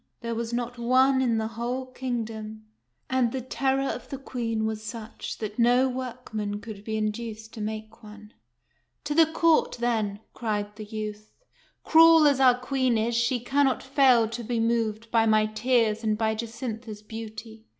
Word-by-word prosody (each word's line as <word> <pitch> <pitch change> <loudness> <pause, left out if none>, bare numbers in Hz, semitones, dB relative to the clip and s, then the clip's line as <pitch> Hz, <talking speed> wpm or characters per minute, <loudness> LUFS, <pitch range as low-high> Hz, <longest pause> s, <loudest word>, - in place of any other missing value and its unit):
There 235 -1 -3
was 230 0 -3
not 240 0 -3
one 260 +2 +4
in 235 -3 +2
the 220 - -1
whole 240 +3 -3
kingdom; 225 -4 -5 0.4
and 255 -3 +1
the 265 - -2
terror 270 +2 0
of - - -5
the 275 - -5
Queen 230 -5 -3
was 220 -1 -3
such 220 0 -7
that 215 +1 -6
no 245 +2 +4
workman 240 -5 -4
could 210 -2 -9
be 220 0 -3
in 215 0 +1
duced 220 0 -8
to 220 - -7
make 220 +1 -6
one. 210 0 -13 0.7
"To 295 - -2
the 325 +1 +6
court, 330 -4 +3
then! 220 -4 0
" - - -45
cried 210 -2 -3
the 215 0 -8
youth. 215 0 -7 0.2
" - - -35
Cruel 325 -1 +7
as 280 -2 +3
our 255 -2 +6
Queen 255 -2 +1
is, 225 +2 0
she 235 +1 +1
cannot 270 +1 +1
fail 265 -4 +4
to 235 +1 -5
be 235 +1 -2
moved 225 -1 -1
by 225 -1 +3
my 215 -1 +4
tears 220 0 +1
and 215 -1 +1
by 220 0 +1
Jacintha's 225 -1 -6
beauty. 220 0 -9
230 Hz, 180 wpm, -26 LUFS, 215-255 Hz, 0.7 s, Cruel